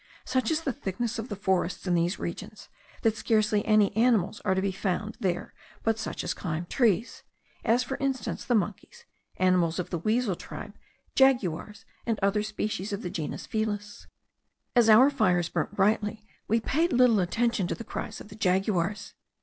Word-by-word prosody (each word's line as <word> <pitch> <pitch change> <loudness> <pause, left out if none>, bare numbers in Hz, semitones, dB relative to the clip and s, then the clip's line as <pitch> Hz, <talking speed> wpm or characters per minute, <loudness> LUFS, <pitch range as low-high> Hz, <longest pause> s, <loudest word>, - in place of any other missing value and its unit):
Such 255 -3 0
is 320 0 +1
the 275 -5 -2
thickness 225 +5 -3
of 225 - -5
the 205 - -3
forests 185 -2 -1
in 180 - +1
these 175 +2 +1
regions, 185 +4 -7 0.3
that 225 -1 +3
scarcely 215 -1 +2
any 210 -2 +4
animals 220 -4 +2
are 190 -2 +2
to - - +1
be 200 - +1
found 195 +3 -2
there 180 -3 -2 0.3
but 225 0 +1
such 220 - -4
as - - -1
climb 170 -2 -4
trees; 225 +1 +1 0.4
as, 240 +3 +3
for 265 +1 -4
instance, 270 -2 -2
the 245 - +1
monkeys, 215 - -3 0.3
animals 180 -3 +2
of 180 - -4
the 170 - -1
weasel 215 +1 +1
tribe, - - -8 0.4
jaguars, 210 - +2 0.2
and 225 -2 +1
other 200 +1 +2
species 210 -2 -3
of 200 +1 -4
the 180 - -4
genus 155 -3 -4
Felis. 210 -2 -3 0.7
As 235 -2 +5
our 250 +6 +8
fires 180 - +2
burnt - - -2
brightly, 210 +1 +1 0.2
we 225 +2 +3
paid 320 +9 +1
little 245 -3 +5
attention 205 +1 +1
to - - -2
the 230 - -8
cries - - -6
of - - -11
the 210 - -11
jaguars. 195 0 0
210 Hz, 175 wpm, -28 LUFS, 185-230 Hz, 0.7 s, our